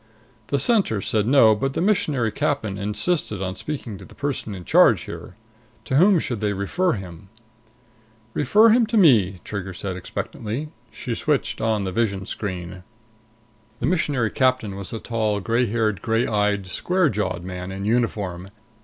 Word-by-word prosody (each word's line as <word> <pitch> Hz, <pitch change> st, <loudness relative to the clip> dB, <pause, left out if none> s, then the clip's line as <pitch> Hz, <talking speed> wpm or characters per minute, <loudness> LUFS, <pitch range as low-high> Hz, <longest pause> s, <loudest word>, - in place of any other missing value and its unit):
The 140 Hz, -, 0 dB
Center 185 Hz, -, +2 dB
said 105 Hz, +2 st, 0 dB
no, 125 Hz, -5 st, +6 dB
but 135 Hz, +5 st, -2 dB
the -, -, -2 dB
Missionary 155 Hz, -, +1 dB
Captain 140 Hz, -9 st, -1 dB
insisted 105 Hz, -, -1 dB
on 95 Hz, -1 st, -3 dB
speaking 120 Hz, -9 st, -6 dB
to -, -, -11 dB
the -, -, -16 dB
person 135 Hz, -7 st, -3 dB
in 90 Hz, -2 st, -9 dB
charge -, -, +5 dB
here. 90 Hz, -, -9 dB, 0.5 s
To 130 Hz, -, 0 dB
whom 190 Hz, +4 st, +6 dB
should 120 Hz, -8 st, -2 dB
they 105 Hz, -1 st, 0 dB
refer 160 Hz, -, 0 dB
him? 95 Hz, -2 st, -8 dB, 1.0 s
"Refer 210 Hz, -, +5 dB
him 230 Hz, 0 st, +4 dB
to 225 Hz, +1 st, 0 dB
me," 105 Hz, -, +4 dB
Trigger 95 Hz, -3 st, -5 dB
said 95 Hz, 0 st, -4 dB
expectantly. 115 Hz, -, -5 dB, 0.2 s
She 120 Hz, -, -5 dB
switched 145 Hz, +1 st, -1 dB
on 110 Hz, -2 st, +1 dB
the 95 Hz, -, -3 dB
vision 100 Hz, -2 st, -1 dB
screen. 90 Hz, -2 st, -5 dB, 1.0 s
The -, -, -1 dB
Missionary 145 Hz, -, +1 dB
Captain 130 Hz, -6 st, +1 dB
was 100 Hz, -1 st, -7 dB
a 115 Hz, -, -3 dB
tall, 110 Hz, -3 st, -1 dB
gray 115 Hz, +5 st, +1 dB
haired, 110 Hz, -3 st, 0 dB
gray 115 Hz, +1 st, +1 dB
eyed, 105 Hz, -2 st, 0 dB
square 180 Hz, -, +1 dB
jawed 100 Hz, -6 st, -2 dB
man 90 Hz, 0 st, -6 dB
in 95 Hz, +1 st, -5 dB
uniform. 105 Hz, -6 st, -1 dB
110 Hz, 160 wpm, -23 LUFS, 100-140 Hz, 1.0 s, no